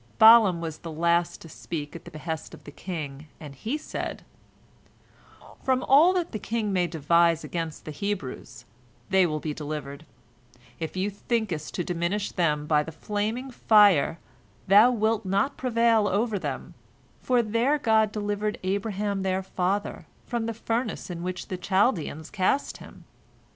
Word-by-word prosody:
Balaam 220 -6 +7
was 160 -2 -5
the 165 - -7
last 170 +2 +1
to - - -11
speak 150 -1 -6
at 170 - -10
the - - -9
behest 155 +1 -6
of - - -18
the 145 - -10
king, 155 -3 -6
and 145 -3 -9
he 225 - -3
said: 310 - -6 1.4
"From 260 -1 +1
all 300 +7 +6
that 355 -2 -1
the 215 - -4
king 215 -1 -2
may 180 -2 +2
devise 170 +1 +2
against 165 -3 -5
the 155 - -5
Hebrews, 185 -3 -5 0.5
they 190 -2 +5
will 155 -1 -2
be 150 0 -4
delivered. 150 0 -6 0.7
If 160 -1 -3
thou 190 +1 -1
thinkest 200 -7 -3
to 175 - -1
diminish 180 +3 -2
them 150 -5 0
by 150 -1 +3
the 160 - -6
flaming 215 - -3
fire, 205 - +4 0.5
thou 205 +5 +7
wilt 225 -2 0
not 200 +8 0
prevail 230 -3 +2
over 210 +1 0
them, - - -5 0.5
for 245 -2 +2
their 230 +7 +1
God 220 -5 +2
delivered 210 0 -2
Abraham 200 +1 -1
their 190 0 -1
father 190 +2 -2 0.2
from 235 -2 -2
the 230 - -3
furnace 230 -3 -3
in 170 -1 -6
which 180 +1 -5
the 185 - -3
Chaldeans 180 - 0
cast 215 +7 0
him. - - -14
190 Hz, 155 wpm, -26 LUFS, 165-220 Hz, 1.4 s, Balaam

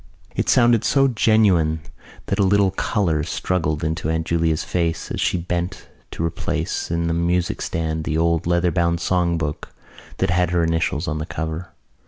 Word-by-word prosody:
It - - -1
sounded 120 -2 +4
so 135 -1 +3
genuine 105 -10 +3 0.5
that 100 - -2
a - - +4
little 100 0 +3
colour 90 -5 0
struggled 80 -1 -1
into 80 0 -2
Aunt 80 0 -1
Julia's 80 -1 +1
face 85 -2 -2
as - - -2
she - - +1
bent 90 +1 -3 0.2
to 85 - -3
replace 80 - -2
in 85 0 -1
the 85 - 0
music 85 +1 0
stand 80 -1 -2
the 80 - -1
old 85 0 +1
leather 85 0 +2
bound 85 -1 +1
songbook 85 -4 -1 0.5
that 95 -1 0
had 90 -1 +2
her 85 -1 +1
initials 80 0 0
on 75 0 -2
the 75 - -4
cover. 80 +2 -5
85 Hz, 170 wpm, -22 LUFS, 80-90 Hz, 0.5 s, sounded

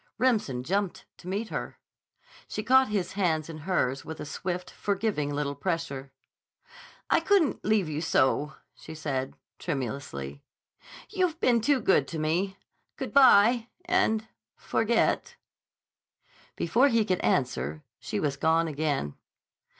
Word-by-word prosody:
Remsen 215 - +1
jumped 195 +5 -2
to 180 - -13
meet 205 +4 -2
her. - - -5 0.7
She 215 - -4
caught 260 +2 +5
his 205 -4 -1
hands 165 -5 0
in 155 - -8
hers 135 -6 0
with 160 - -8
a - - -5
swift, 180 +5 -4
forgiving 195 -8 -1
little 145 0 -2
pressure. 145 -6 -3 1.0
"I - - +5
couldn't 385 -8 +2
leave 210 -5 +2
you 155 0 -3
so," 150 -2 +2 0.2
she 160 - -11
said 135 -4 -3 0.2
tremulously. 125 - -4 0.7
"You've 365 -5 0
been 235 -6 +3
too 275 +4 +3
good 190 - +3
to 165 - -5
me. 175 +6 -1 0.4
Good - - -5
bye, 240 -3 +6 0.2
and—forget." 220 - 0 1.2
Before 240 - +3
he 230 -5 +2
could 185 -3 0
answer 75 - 0 0.2
she - - -3
was 145 -2 -1
gone 165 +2 +2
again. 145 - -1
170 Hz, 125 wpm, -28 LUFS, 145-220 Hz, 1.2 s, bye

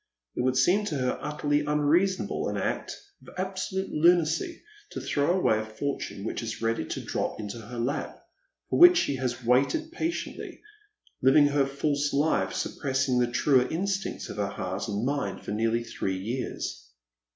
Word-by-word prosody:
It - - -1
would 130 +1 +1
seem 180 +11 +4
to 160 - -2
hci 130 -2 0
utterly 150 0 0
unreasonable, 150 +6 +1
an - - -3
act - - -2 0.2
of - - -14
absolute 190 0 -3
lunacy 170 - +2 0.3
to - - -4
throw 150 +5 +1
away 110 -12 +3
a - - -2
fortune 110 -2 -4
which 110 - -3
is 110 -1 -5
ready 115 -6 0
to - - -4
drop - - -2
into 105 +2 -5
her 115 +2 -9
lap, 125 +6 -2 0.5
for - - +2
which 355 +1 +9
she 140 - +1
has 125 -1 -3
"waited 140 - +2
patiently, 335 0 -4 0.6
hving 145 +2 +6
her 140 -1 +2
false 145 +1 -1
life, 145 +3 +2
suppressing 130 -2 0
the 120 - +3
truer 130 0 +3
instincts 195 +3 -2
of - - -8
her 100 -1 0
heart 95 -1 -4
and 105 +2 -2
mind 140 +1 -2
for - - -4
nearly 115 +2 +1
three 95 -4 -3
years. 95 - -4
140 Hz, 165 wpm, -27 LUFS, 115-160 Hz, 0.6 s, which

